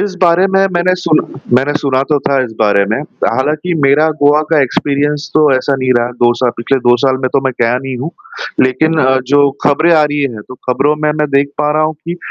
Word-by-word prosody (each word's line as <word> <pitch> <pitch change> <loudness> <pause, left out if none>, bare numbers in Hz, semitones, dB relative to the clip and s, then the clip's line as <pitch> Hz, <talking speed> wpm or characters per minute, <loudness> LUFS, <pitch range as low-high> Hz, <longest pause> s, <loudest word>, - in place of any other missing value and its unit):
इस 200 -2 -2
बारे 175 +2 +4
में 195 0 +1
मैंने 175 +1 +1
सुन 160 -3 +2 0.4
मैंने 135 +3 0
सुना 135 -2 +1
तो 150 -2 +2
था 135 0 0
इस 120 - -7
बारे 100 -2 +2
में, 110 - 0 0.3
हालाँकि 155 +6 -1
मेरा 145 +3 +3
गोवा 145 +1 +4
का 160 -2 +3
एक्सपीरियंस 145 +3 -2
तो 155 -2 +4
ऐसा 135 +2 0
नहीं 130 -1 0
रहा, 120 +1 -2
2 120 0 +4
सा 125 -2 +2
पिछले 135 +3 0
2 120 0 +5
साल 130 -1 +2
में 130 - +1
तो 140 - +2
मैं 130 - 0
गया 120 +1 +1
नहीं 135 0 -5
हूँ। 140 +7 -4 0.6
लेकिन 155 +5 0 0.3
जो 145 -1 +4
खबरें 155 +4 +3
आ 155 - +4
रही 145 0 -2
हैं, 120 -6 -4
तो 130 - -9
खबरों 145 +4 +1
में 150 0 -1
मैं 150 - 0
देख 140 0 +1
पा 150 0 +1
रहा 155 +1 +1
हूँ 155 0 -1
कि, 170 +3 -7
145 Hz, 230 wpm, -13 LUFS, 130-155 Hz, 0.6 s, 2